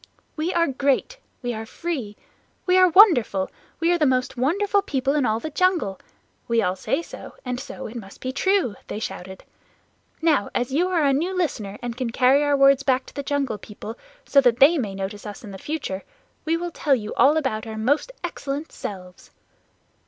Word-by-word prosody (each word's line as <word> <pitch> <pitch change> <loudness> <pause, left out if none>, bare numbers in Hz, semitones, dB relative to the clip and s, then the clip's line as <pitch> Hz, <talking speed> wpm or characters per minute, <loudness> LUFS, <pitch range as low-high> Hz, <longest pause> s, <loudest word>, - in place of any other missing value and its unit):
"We 320 +3 -1
are 340 -1 +3
great. 280 - 0 0.2
We 245 0 -1
are 220 0 -5
free. 260 -10 -4 0.5
We 365 -1 +3
are 370 -1 +6
wonderful. 310 - +5 0.3
We 335 +2 +2
are 350 - +1
the 305 - +4
most 255 0 0
wonderful 395 +11 +1
people 275 -7 -1
in 290 -4 +2
all 220 +1 +1
the 310 +6 -5
jungle! 340 - +1 0.5
We 230 -1 +2
all 185 -4 +1
say 270 - -1
so, - - -10
and 250 -1 -3
so - - -8
it 220 - -8
must 200 -5 -9
be 255 - -3
true," 370 - +1
they - - -5
shouted. 190 -3 -6 0.8
"Now 310 -10 +2
as 245 +1 0
you 345 +6 +2
are 340 -5 +2
a 275 - +4
new 350 +7 -1
listener 215 - -2
and 240 -1 -4
can 250 -2 -2
carry 260 +4 +4
our 290 -1 +2
words 275 0 +5
back 260 -1 +1
to - - -14
the 285 - -4
Jungle 275 -6 -1
People 215 +2 -8 0.3
so 280 - +5
that 245 -3 +3
they 295 +5 +6
may 205 -6 -3
notice 195 +2 -5
us 205 +2 -8
in 200 -3 -8
future, 245 -11 -4 0.4
we 325 +1 +1
will 350 0 -4
tell 290 -3 +2
you 215 -3 -5
all 295 +3 +5
about 235 -7 -1
our 220 0 -6
most 285 - +1
excellent 295 -3 -4
selves." 180 -3 -8
270 Hz, 195 wpm, -23 LUFS, 220-320 Hz, 0.8 s, are